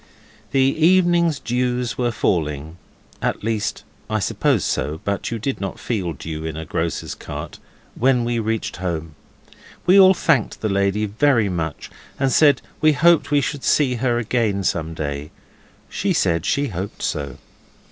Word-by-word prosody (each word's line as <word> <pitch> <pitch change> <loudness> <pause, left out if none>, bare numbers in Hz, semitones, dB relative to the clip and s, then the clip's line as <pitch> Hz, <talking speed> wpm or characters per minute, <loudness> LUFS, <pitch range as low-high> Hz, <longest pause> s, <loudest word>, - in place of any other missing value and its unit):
The 135 - +2
evening 170 +4 +4
dews 125 0 -1
were 120 -1 0
falling 80 -7 -1 0.4
at - - -2
least, 110 -1 -2 0.3
I 110 - 0
suppose 100 - +1
so, 75 +2 -2
but 100 -1 -2
you 115 - -3
do 125 +5 -2
not 95 -2 -4
feel 95 -8 -2
dew 80 +2 -6
in 80 -1 -4
a 80 - -5
grocer's - - -3
cart - - -8 0.3
when 125 -1 +2
we 120 0 0
reached 110 0 -2
home. 80 -3 -4 0.7
We 190 +2 +6
all 190 0 +8
thanked 150 -9 +1
the 110 - 0
lady 100 +2 +1
very 115 0 +2
much, 80 -4 -4 0.3
and 135 -1 +2
said 145 -1 +4 0.2
we 155 0 +5
hoped 165 -2 +4
we 145 -1 +3
should 140 0 -3
see 140 -4 +3
her 120 0 +1
again 115 -4 0
some 80 -2 -1
day. 70 -1 -4 0.6
She - - -1
said 85 0 +1
she 140 -1 +1
hoped 95 0 -6
so. 70 -3 -3
110 Hz, 155 wpm, -21 LUFS, 85-135 Hz, 0.7 s, all